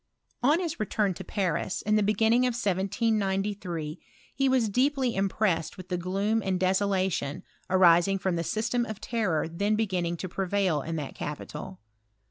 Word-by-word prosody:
235 265 +3 +4
On - - -2
his 335 -5 -4
return 210 -2 0
to - - -8
Paris, 185 -3 -2
in 215 +1 +2
the 215 - +4
beginning 220 +4 +3
of 245 - -1
1793, 195 -5 -1 0.3
he 270 +1 +1
was 255 -4 +3
deeply 255 +3 +1
impressed 195 -3 0
with 185 -1 -10
the 180 - 0
gloom 195 +5 0
and 185 -1 0
desolation 185 -5 0 0.3
arising 185 +1 +5
from 190 -1 -1
the 170 - -1
system 225 +6 0
of 215 -2 -6
terror 215 -9 0
then 200 +6 0
beginning 180 -6 -1
to 185 - -4
prevail 185 -3 0
in 165 +4 -4
that 150 -4 -4
capital. 150 +5 -6
195 Hz, 160 wpm, -28 LUFS, 180-220 Hz, 0.3 s, arising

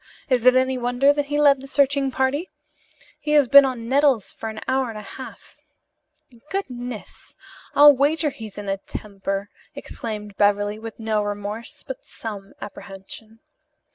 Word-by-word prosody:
Is 250 -2 +2
it 255 - +7
any 260 0 +2
wonder 245 +4 +3
that 290 -1 -2
he 290 +1 -1
led 280 -2 +5
the 270 - -10
searching 280 0 +2
party? 265 +7 -1 0.7
He 300 - -2
has 290 -3 +5
been 280 +2 +9
on 245 -3 -4
nettles 270 -4 +2
for 225 - -6
an 220 0 -7
hour 260 -1 +1
and 220 - -7
a 210 - -7
half." 260 +6 -11 0.9
"Goodness, 250 - -6 0.4
I'll 290 0 +9
wager 295 +3 +1
he's 220 -5 -10
in 205 -1 -6
a 195 0 0
temper!" 195 0 -5 0.2
exclaimed 210 -3 -7
Beverly, 205 +1 +2
with 225 0 -9
no 220 -1 0
remorse, 205 +7 -5
but 265 - -7
some 200 -3 -8
apprehension. 210 +3 -10
245 Hz, 155 wpm, -23 LUFS, 210-275 Hz, 0.9 s, been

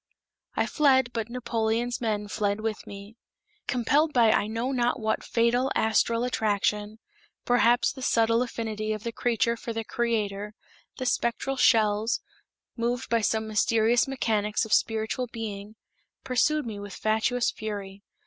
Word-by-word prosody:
I - - +1
fled, 260 -5 +3
but 225 -1 -3
Napoleon's 235 0 -1
men 210 -3 -1
fled 205 0 -1
with 220 -1 -4
me. 200 +3 -10 0.5
Compelled 290 +6 +2
by 230 -3 +5
I 205 - +2
know 230 +4 -2
not 245 0 0
what 220 -1 -1
fatal 245 +3 +1
astral 230 +1 +2
attraction, 210 -2 0 0.5
perhaps 245 0 +3
the 265 - -10
subtle 230 -1 +2
affinity 220 -3 -3
of 215 -1 -6
the 235 - -3
creature 235 0 0
for 230 0 -6
the 225 0 -3
creator, 210 -3 -2 0.4
the 255 - -4
spectral 250 +2 0
shells, 220 -3 +3 0.6
moved 240 +2 -2
by 230 -1 +3
some 220 +1 0
mysterious 225 +3 +2
mechanics 220 -5 0
of 220 - -2
spiritual 225 +3 +1
being, 215 -2 -7 0.5
pursued 300 +4 +1
me 215 -3 -6
with 205 -2 -8
fatuous 220 +3 +1
fury. 200 -2 -6
225 Hz, 140 wpm, -27 LUFS, 215-245 Hz, 0.6 s, by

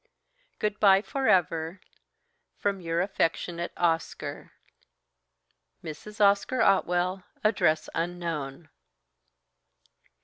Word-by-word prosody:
"Good 210 -1 -2
bye, 195 -1 +6
for 275 +1 -2
ever! 165 0 +2 0.8
From 200 -2 -1
your 165 0 0
affectionate 170 -2 -1
"OSCAR. 165 -2 -2 1.3
"Mrs. 165 +7 -9
Oscar 205 +5 +3
Otwell 185 -1 +2 0.2
(Address 160 -7 +2
unknown)." 165 -4 -4
175 Hz, 75 wpm, -27 LUFS, 165-200 Hz, 1.3 s, bye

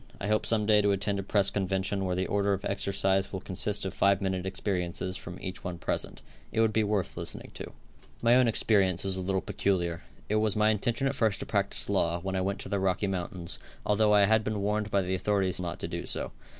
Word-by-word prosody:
I - - -3
hope 110 0 +2
some 110 -2 +2
day 105 -1 +5
to 100 - +2
attend 100 0 0
a - - 0
press 100 0 +2
convention 95 0 -1
where 90 -1 -1
the 95 +1 0
order 100 0 +1
of 95 +1 -3
exercise 95 -1 0
will 95 - -3
consist 95 +2 -2
of 95 - -3
five 100 -1 +3
minute 95 -1 -2
experiences 90 -1 -2
from 90 0 -7
each 95 0 -6
one 90 -1 -4
present 85 - -3 0.3
It - - -1
would 110 -1 +3
be 110 - +3
worth 100 -3 -1
listening - - -5
to. - - -7 0.5
My 120 0 +4
own 125 0 +5
experience 100 -5 +3
was 95 -1 0
a 95 - -1
little 95 +1 0
peculiar. 85 -4 -1 0.3
It 105 - +1
was 110 -1 +2
my 105 0 +4
intention 120 +5 0
at 135 - +1
first 110 -7 +1
to - - -4
practice 100 -2 -1
law, 85 -4 +1
when 95 +2 -3
I 95 - +1
went 100 +1 -1
to - - -6
the 100 - 0
Rocky 95 +1 +1
Mountains, 90 -2 -3 0.3
although 105 0 +3
I 105 -1 +6
had 110 +2 +3
been 105 -1 -2
warned 105 +1 0
by 100 -1 +2
the 90 +1 -2
authorities 95 -1 0
not 85 -2 -4
to - - -2
do - - -5
so. - - -3
100 Hz, 235 wpm, -29 LUFS, 95-105 Hz, 0.5 s, I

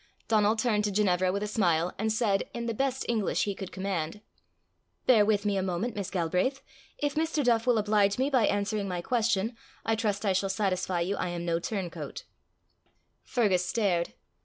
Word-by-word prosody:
Donal 215 -1 +3
turned 220 -2 +1
to 205 - 0
Ginevra 185 -3 +2
with 200 +2 -2
a - - -2
smile, 175 -5 +1
and 220 +1 +1
said, 215 -3 +1
in 235 0 -3
the 230 - -1
best 265 +2 -1
English 220 -4 +1
he 200 - -1
could 190 -1 -7
command 190 -2 -3 0.9
"Bear 230 -5 +6
with 205 -1 +1
me 205 -1 +1
a - - +1
moment, 190 +5 -2
Miss 200 -3 -3
Galbraith. 185 +10 0 0.3
If 290 -1 -1
Mr. 315 -1 0
Duff 235 -1 +2
will 245 -2 +4
oblige 205 -1 +2
me 265 +3 +1
by 250 -5 +4
answering 205 0 0
my 180 -2 -3
question, 230 -1 +1 0.3
I 225 - +2
trust 215 -2 -1
I 195 - +3
shall 195 +1 0
satisfy 185 -3 0
you 190 +3 -1
I - - -1
am 175 0 -4
no 170 -1 +1
turncoat." 185 -2 -5 1.0
Fergus 200 -8 +1
stared. 185 -4 0
205 Hz, 185 wpm, -29 LUFS, 185-225 Hz, 1.0 s, Bear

